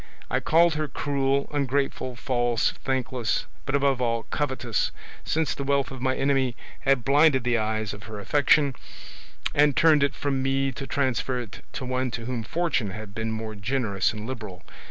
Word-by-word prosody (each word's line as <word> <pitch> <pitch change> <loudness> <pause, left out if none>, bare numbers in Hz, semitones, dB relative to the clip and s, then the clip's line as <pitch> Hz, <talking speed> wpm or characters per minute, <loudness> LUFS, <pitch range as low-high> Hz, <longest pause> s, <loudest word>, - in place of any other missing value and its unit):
I - - +2
called 165 +1 +4
her 155 0 -1
cruel, 140 -1 0
ungrateful, 135 -2 -1
false, 120 -2 +1
thankless, 130 -3 -1 0.2
but 135 - +1
above 140 -2 +2
all 115 -2 0
covetous, 130 -6 0 0.3
since 160 -1 0
the 140 - -4
wealth 140 0 +1
of 130 -2 -7
my 130 0 +1
enemy 135 -3 +1 0.2
had 135 -4 +2
blinded 140 -2 +5
the 120 -1 +2
eyes 110 -1 -1
of 105 +1 -10
her 110 -1 -7
affection, 140 +4 +3 0.8
and 145 -1 +4
turned 155 -3 +6
it 140 0 +2
from 135 -2 -1
me 135 0 +1
to 135 +2 -7
transfer 130 -2 0
it 120 -4 -8
to 130 - -4
one 130 0 -1
to 115 0 -5
whom 125 -1 -2
fortune 145 - -1
had 100 +1 -8
been 110 +1 -2
more 110 0 -4
generous 105 -2 0
and 110 -1 -7
liberal. 105 -7 -7
130 Hz, 175 wpm, -26 LUFS, 115-140 Hz, 0.8 s, turned